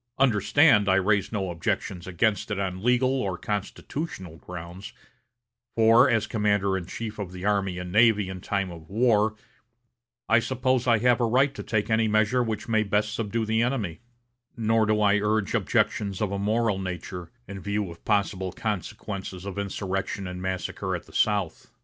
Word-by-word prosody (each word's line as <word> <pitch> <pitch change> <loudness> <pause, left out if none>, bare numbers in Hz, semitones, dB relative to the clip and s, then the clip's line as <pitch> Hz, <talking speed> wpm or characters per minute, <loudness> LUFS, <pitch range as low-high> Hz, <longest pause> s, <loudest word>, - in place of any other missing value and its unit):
Understand, 125 -2 +4
I 95 - +5
raise 100 0 +2
no 95 -4 -2
objections 85 +2 -3
against 100 +5 0
it 105 - -2
on 95 -2 -3
legal 125 +3 +2
or 95 -2 -2
constitutional 100 - -5
grounds, 90 +3 -9 0.8
for, 115 +3 +6
as 110 -3 +2
commander 105 -3 +1
in 90 -2 -4
chief 110 +1 -6
of 95 -3 -4
the 90 +1 -7
army 100 -3 0
and 90 0 -6
navy 105 -1 +4
in 95 -1 -7
time 100 -2 -2
of 80 -2 -12
war, 110 -1 +2 0.9
I 115 - +5
suppose 130 +1 0
I 115 -2 +5
have 120 +2 +3
a - - +3
right 130 +4 +3
to - - -7
take 105 -1 -1
any 110 0 +3
measure 110 +3 +2
which 110 -3 -3
may 110 -2 +2
best 105 +1 0
subdue 115 0 -2
the 110 +1 +1
enemy; 115 -9 -1 0.6
nor 110 -1 +2
do 105 0 +2
I 105 0 +4
urge 105 -1 0
objections 100 -3 0
of 105 -3 -1
a 100 - -2
moral 105 0 +1
nature, 90 -1 -6 0.2
in 100 -1 -7
view 100 -1 -2
of 85 - -14
possible 95 -3 0
consequences 100 -2 -5
of 100 0 -5
insurrection 95 0 -3
and 90 0 -6
massacre 95 -1 -3
at - - -7
the - - -18
South. 100 -5 0
105 Hz, 175 wpm, -26 LUFS, 95-110 Hz, 0.9 s, for